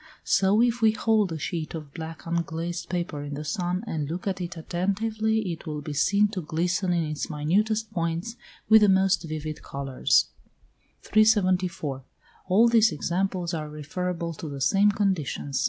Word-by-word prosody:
So, 200 +4 +3
if 240 0 +1
we 220 -1 +5
hold 215 -3 +2
a 160 - -3
sheet 155 +2 -4
of 150 -3 -8
black 160 -1 -8
unglazed 170 0 -3
paper 170 -4 -3
in 145 0 -5
the 150 +1 -6
sun, 180 +5 -2
and 155 -9 -3
look 175 +3 -5
at 190 -2 -2
it 175 0 -5
attentively, 215 +4 -1
it 165 0 -8
will 150 -1 -4
be 150 0 -6
seen 200 +8 +3
to 195 -3 -4
glisten 175 +4 -1
in 170 -1 +1
its 155 -1 -4
minutest 210 +9 0
points 170 +4 -2 0.3
with 220 0 +7
the 210 - +5
most 190 0 +3
vivid 155 -2 -5
colours. 135 -2 +1 0.7
374. 185 -10 +2 0.4
All 205 +6 +5
these 225 -3 +5
examples 175 +2 -2
are 155 -2 -3
referable 170 +3 -4
to 155 0 -7
the 140 -1 -6
same 195 +10 +4
conditions. 185 - -1
175 Hz, 165 wpm, -26 LUFS, 155-200 Hz, 0.7 s, with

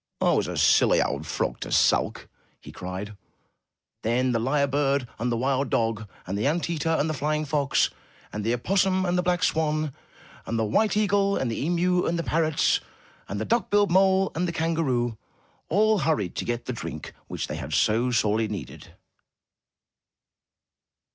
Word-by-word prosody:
I - - +3
was - - +1
a - - -4
silly - - +4
old 70 +3 -1
frog - - -2
to - - -6
sulk!*' - - +2 0.3
he - - -12
cried. 95 +3 -6 0.9
Then 125 +3 +1
the 115 - +1
lyre 140 +5 +1
bird, 140 -2 0
and 120 +2 -1
the 115 - 0
wild 135 +2 0
dog, 115 -2 -1 0.2
and 95 - -4
the 105 +6 0
ant 170 +3 0
eater, 165 -1 -1
and 160 -1 +1
the 155 - -1
flying 150 +2 -1
fox, 145 -1 +1 0.4
and 105 - -4
the 115 - 0
opossum, 190 +7 +1
and 175 0 0
the 180 - +2
black 180 -1 0
swan, 155 -2 0 0.5
and 115 - -1
the 110 - +1
white 210 - +1
eagle, 200 -1 +2
and 120 - -1
the 115 - -3
emu, 180 +2 +1
and 170 - 0
the 170 - -2
parrots, 160 -2 +1 0.5
and 100 - -3
the 110 - -2
duck 235 - 0
billed 205 -2 +3
mole, 190 +1 +4
and 175 +2 -1
the - - -1
kan 165 0 -1
garoo 120 -7 0 0.5
all 215 +3 +3
hurried 145 - 0
to - - -2
get 120 0 -3
the - - -3
drink - - -7
which - - -4
they - - -5
had - - -6
so 115 +4 +2
sorely 110 -2 +1
needed. 105 -3 -8
145 Hz, 180 wpm, -25 LUFS, 115-175 Hz, 0.9 s, silly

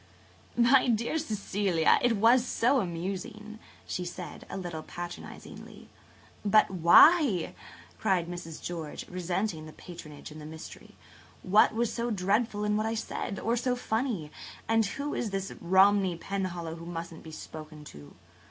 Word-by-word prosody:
"My 250 +2 +5
dear 235 +6 +1
Cecilia, 200 - +1
it 240 -3 +2
was 235 +4 +5
so 255 +2 +2
amusing," 195 +4 -5 0.3
she 180 - -3
said, 175 -2 -8
a - - -5
little 175 -4 -5
patronizingly. 175 +2 -9 0.5
"But 210 0 +4
why! 190 - +6 0.2
" - - -21
cried 185 -5 +1
Mrs. 175 -2 -7
George, 165 -4 -5
resenting 180 -2 -2
the 155 - -11
patronage 155 -4 -10
and 155 0 -10
the 150 - -8
mystery. 160 0 -11 0.5
"What 210 +3 +4
was 235 0 0
so 235 0 -2
dreadful 205 +1 0
in 210 0 +1
what 215 +1 0
I 225 - -1
said? 215 -2 -4
Or 230 +1 0
so 245 +1 0
funny? 220 - -2 0.4
And 225 0 +3
who 280 +7 -4
is 230 - -2
this 195 0 -3
Romney 190 0 +4
Penhallow 175 -3 -4
who 165 +1 -9
musn't 170 -1 -6
be 160 - -11
spoken 155 -1 -9
to?" 75 0 -13
195 Hz, 150 wpm, -29 LUFS, 170-225 Hz, 0.5 s, why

